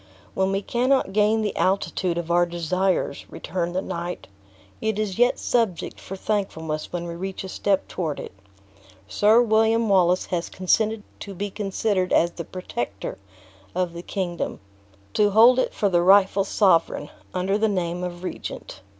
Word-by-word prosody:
"When 190 0 +1
we 195 +1 -1
cannot 250 -3 +1
gain 215 +1 +3
the 210 - -2
altitude 185 -2 0
of 170 0 -3
our 175 0 +4
desires," 175 -2 -1
returned 175 +1 -4
the 185 - 0
knight, 175 +1 -5 0.6
"it 220 -1 -1
is 210 -2 -2
yet 245 +1 +4
subject 225 -8 -1
for 195 - -7
thankfulness 160 -7 -3
when 175 -1 -3
we 170 - -5
reach 190 +3 -5
a - - -6
step 195 +1 0
toward 160 -5 -3
it. - - -7 0.8
Sir 210 - +4
William 225 0 +3
Wallace 180 -2 +3
has 170 -1 -1
consented 215 +3 +1 0.2
to 200 -2 -8
be 200 +2 -4
considered 195 -2 -1
as 170 +1 +3
the 170 - -6
protector 120 - -5 0.6
of 180 -2 -1
the 170 - -6
kingdom; 175 -1 -3 0.5
to 205 -1 +3
hold 230 +5 +6
it - - +1
for 205 - 0
the 175 -3 +3
rightful 195 +1 +5
sovereign, 170 -7 +2 0.3
under 190 +3 0
the 220 0 +2
name 180 -2 -2
of 175 0 -5
regent." 140 - -6
190 Hz, 160 wpm, -24 LUFS, 175-210 Hz, 0.8 s, hold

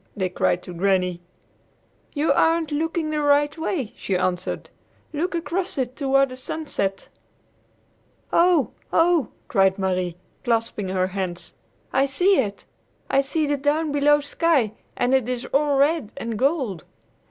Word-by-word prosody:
they 190 -2 0
cried 180 0 0
to 180 - -8
Granny. 180 -1 +1 0.9
"You 295 +2 +2
aren't 325 -1 +2
looking 320 +1 -1
the 305 -1 0
right 290 +1 +3
way," 320 - -3
she 190 - -1
answered. 180 0 -2 0.4
"Look 345 +4 -1
across 340 +3 -2
it 255 -1 -2
toward 275 -1 +2
the 255 - -7
sunset." 255 -8 -3 1.3
"Oh! 340 -4 +4 0.2
Oh!" 330 -5 +3 0.2
cried 195 -2 +3
Marie, 185 -3 -1 0.3
clasping 225 -4 -1
her 185 -1 +1
hands; 185 -2 -4 0.4
"I 270 +1 +3
see 360 +8 +3
it! 205 -6 -2 0.5
I 275 - +4
see 305 +3 -1
the 290 0 0
down 295 +2 0
below 295 +1 +4
sky, 290 -6 +1 0.3
and 245 +2 +1
it 260 -2 +2
is 250 0 -3
all 285 0 +3
red 285 -4 +2
and 230 0 -4
gold!" 260 - 0
275 Hz, 140 wpm, -23 LUFS, 200-310 Hz, 1.3 s, Oh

